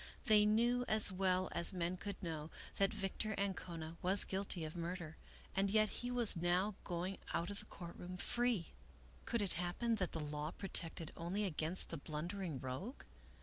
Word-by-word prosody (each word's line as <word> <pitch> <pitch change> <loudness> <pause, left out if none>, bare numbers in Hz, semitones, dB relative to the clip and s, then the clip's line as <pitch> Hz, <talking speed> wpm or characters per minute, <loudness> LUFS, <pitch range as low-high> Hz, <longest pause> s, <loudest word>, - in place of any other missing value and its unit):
They 210 -1 +6
knew 240 +3 +3
as 215 -2 +7
well 185 0 +1
as 170 +3 +5
men 175 0 -1
could 200 +2 -7
know, 160 -2 -4 0.3
that 195 0 +3
Victor 200 +2 -3
Ancona 170 -4 -4
was 190 +2 +7
guilty 190 -3 -2
of 155 - -7
murder, 170 -2 -5 0.4
and 195 +1 +2
yet 215 +1 +3
he 245 - -4
was 245 -4 +5
now 175 +4 +1
going 180 +2 -3 0.2
out 170 +3 -1
of 200 - -3
the - - -6
court 170 -2 -9
room 180 +1 -7
free. 240 -2 0 0.5
Could 235 -3 0
it 195 - +2
happen 180 +7 -1
that 185 -3 -1
the 160 - -2
law 150 0 -3
protected 165 -4 +1
only 185 +5 -2
against 165 0 -1
the 165 - -4
blundering 160 +1 -4
rogue? 130 - -6
185 Hz, 175 wpm, -38 LUFS, 170-205 Hz, 0.5 s, as